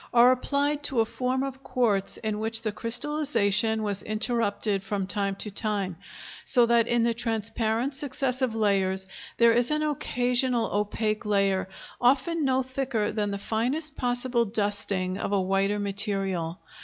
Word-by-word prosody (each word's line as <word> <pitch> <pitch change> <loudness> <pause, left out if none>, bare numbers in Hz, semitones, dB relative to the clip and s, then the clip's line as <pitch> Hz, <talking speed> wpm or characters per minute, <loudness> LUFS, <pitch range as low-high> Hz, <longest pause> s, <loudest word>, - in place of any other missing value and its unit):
are 240 +1 +7
applied 285 +3 0
to 275 -4 +1
a 225 - +4
form 255 +3 -2
of 270 -1 -5
quartz 230 -7 +1
in 215 -1 -3
which 225 +1 0
the 215 - -1
crystallization 230 -3 0
was 200 -2 -1
interrupted 215 -2 -1
from 195 -1 -2
time 195 0 -1
to 210 +2 -4
time, 200 -3 -1 0.5
so 245 -3 +5
that 235 -1 +3
in 240 -1 +2
the 235 0 +2
transparent 225 +2 -1
successive 265 -3 -1
layers 195 -3 +1 0.3
there 235 0 +6
is 240 +1 +2
an 305 0 0
occasional 250 -4 0
opaque 215 +1 -1
layer, 195 -2 +1 0.3
often 275 +6 +2
no 265 -1 +2
thicker 260 -4 -2
than 210 -1 -1
the 200 - -3
finest 255 +9 -2
possible 245 -1 +1
dusting 200 -3 0
of - - -3
a 200 - +2
whiter 195 +2 +1
material. 195 -4 -1
225 Hz, 150 wpm, -26 LUFS, 205-255 Hz, 0.5 s, are